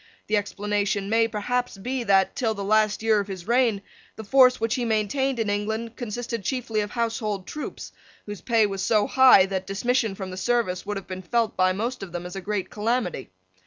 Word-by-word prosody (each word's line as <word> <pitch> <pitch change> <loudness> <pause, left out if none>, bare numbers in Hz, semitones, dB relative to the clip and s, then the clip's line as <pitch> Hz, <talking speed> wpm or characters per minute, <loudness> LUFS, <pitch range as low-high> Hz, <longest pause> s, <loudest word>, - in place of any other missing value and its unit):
The 215 - 0
explanation 205 -1 -1
may 225 0 +3
perhaps 245 +2 -2
be 250 +5 -3
that, 195 -2 +3
till 225 -3 0
the 200 - -5
last 215 +1 +2
year 220 -1 +3
of 200 - -3
his 190 -2 -7
reign, 235 -4 +2 0.3
the 220 - -8
force 255 +3 +5
which 225 0 0
he 250 - -1
maintained 235 +4 0
in 225 -2 -1
England 220 +3 -2
consisted 235 -1 -4
chiefly 235 -2 -2
of 205 -1 -2
household 220 -4 -2
troops, 300 - -7 0.3
whose 205 -2 -7
pay 230 -3 +3
was 195 -2 -3
so 210 +1 +2
high 260 -8 +6
that 190 -1 -4
dismission 225 +1 0
from 190 -1 -6
the 185 - -7
service 230 -5 -1
would 205 -1 -2
have 195 - -7
been 185 0 -6
felt 230 +3 0
by 185 0 +3
most 230 +7 -3
of 190 -3 -8
them 175 0 -5
as 180 - -7
a 195 - -5
great 200 -1 -3
calamity. 220 - -2
215 Hz, 205 wpm, -25 LUFS, 195-235 Hz, 0.3 s, high